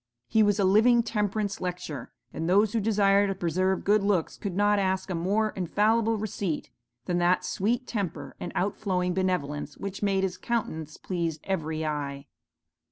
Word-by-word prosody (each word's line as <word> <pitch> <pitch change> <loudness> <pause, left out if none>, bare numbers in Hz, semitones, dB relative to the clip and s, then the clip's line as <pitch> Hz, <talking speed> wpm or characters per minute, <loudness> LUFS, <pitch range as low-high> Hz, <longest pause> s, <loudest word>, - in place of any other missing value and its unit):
He 220 - +3
was 205 -1 +3
a 200 - +2
living 225 +5 +5
temperance 210 -2 -1
lecture, 180 -8 -5 0.2
and 165 +2 -2
those 205 +3 +4
who 230 - +2
desire 200 -1 +3
to 195 - -1
preserve 185 +2 0
good 210 +1 +4
looks 195 -5 +1
could 195 -4 -5
not 205 +1 +3
ask 190 0 0
a - - 0
more 200 +6 +1
infallible 215 +5 +1
receipt, 200 -6 -3 0.3
than 175 -1 0
that 175 +1 +2
sweet 235 +6 0
temper 185 -11 -4
and - - -5
out 195 +2 0
flowing 180 -3 -1
benevolence 155 -6 -2
which 195 0 -6
made 195 -2 +1
his 185 -1 -1
countenance 160 -10 -3
please 170 -4 -3
every 160 -4 -2
eye. 140 -2 -3
190 Hz, 165 wpm, -27 LUFS, 175-205 Hz, 0.3 s, living